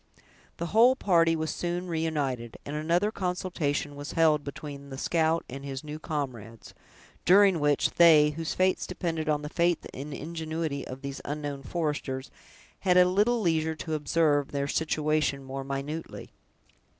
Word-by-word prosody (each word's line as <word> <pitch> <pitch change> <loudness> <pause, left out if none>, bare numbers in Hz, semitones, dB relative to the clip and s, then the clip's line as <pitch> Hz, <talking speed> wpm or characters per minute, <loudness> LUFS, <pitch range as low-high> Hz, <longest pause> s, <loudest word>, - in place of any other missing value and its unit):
The 170 - -3
whole 240 +4 +6
party 165 -8 +3
was 160 0 -2
soon 175 +1 -3
reunited, 150 -8 -2
and 145 - -5
another 170 +7 +1
consultation 175 -7 -2
was 145 +1 -7
held 155 -3 +3
between 140 0 -8
the 135 - -7
scout 165 +2 +1
and 135 +2 -8
his 135 -1 -5
new 150 0 -7
comrades, 125 -8 -5 0.5
during 195 -1 +6
which, 145 -1 +2
they, 155 -3 +6
whose 160 +1 -4
fates 185 0 +1
depended 165 -4 -3
on 150 -1 +1
the - - -4
faith 170 +2 +1
and 140 +3 -7
ingenuity 160 -1 -4
of 130 +2 -8
these 140 0 -5
unknown 145 -1 -4
foresters, 145 -4 -3 0.5
had 180 -2 +3
a 180 - +8
little 210 +6 +2
leisure 160 -3 +1
to 155 +1 -5
observe 150 -1 +2
their 140 0 -1
situation 155 -2 0
more 135 0 -5
minutely. 140 +4 -5
155 Hz, 150 wpm, -28 LUFS, 140-170 Hz, 0.5 s, a